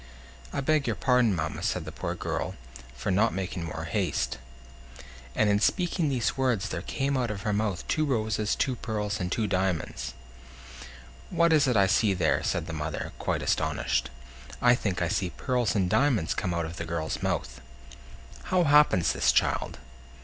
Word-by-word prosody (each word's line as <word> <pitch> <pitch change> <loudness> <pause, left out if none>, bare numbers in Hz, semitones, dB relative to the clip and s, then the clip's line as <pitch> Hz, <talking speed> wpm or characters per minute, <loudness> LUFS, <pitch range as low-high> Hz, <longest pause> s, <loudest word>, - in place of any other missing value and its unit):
"I 140 - -2
beg 150 0 +1
your - - 0
pardon, 125 -6 +3
mamma," 80 - -3
said - - -1
the - - -6
poor - - -4
girl, - - -3 0.4
"for 70 +11 -2
not 105 +3 +2
making 95 -2 -3
more 80 - -5
haste." - - -1 1.0
And 110 - +3
in 100 0 +3
speaking 175 - +1
these 125 -5 0
words 125 -7 0
there 85 - -3
came 135 +8 -1
out 125 -3 0
of 100 -3 -5
her 105 - 0
mouth 100 -4 -1
two 155 - +1
roses, 110 -6 0
two 130 - 0
pearls, 105 -3 -3
and 90 -1 -3
two 110 - 0
diamonds. 90 -9 -2 1.1
"What 170 -1 +3
is 145 -3 +4
it 125 -3 +2
I 100 - +6
see 100 0 +3
there?" 85 -3 +2
said 85 - -1
the 80 - -6
mother, 80 0 -4
quite - - -1
astonished. - - 0 0.5
"I 120 0 +5
think 95 -7 -1
I - - +1
see 95 0 0
pearls 125 +1 -1
and 95 -3 +2
diamonds 115 - +2
come 90 - -2
out 85 -1 -1
of 85 +2 -7
the 85 - -4
girl's 80 -2 -3
mouth! - - -2 0.8
How 185 -1 +2
happens 150 - +5
this, - - +3
child?" - - 0
105 Hz, 180 wpm, -28 LUFS, 90-130 Hz, 1.1 s, I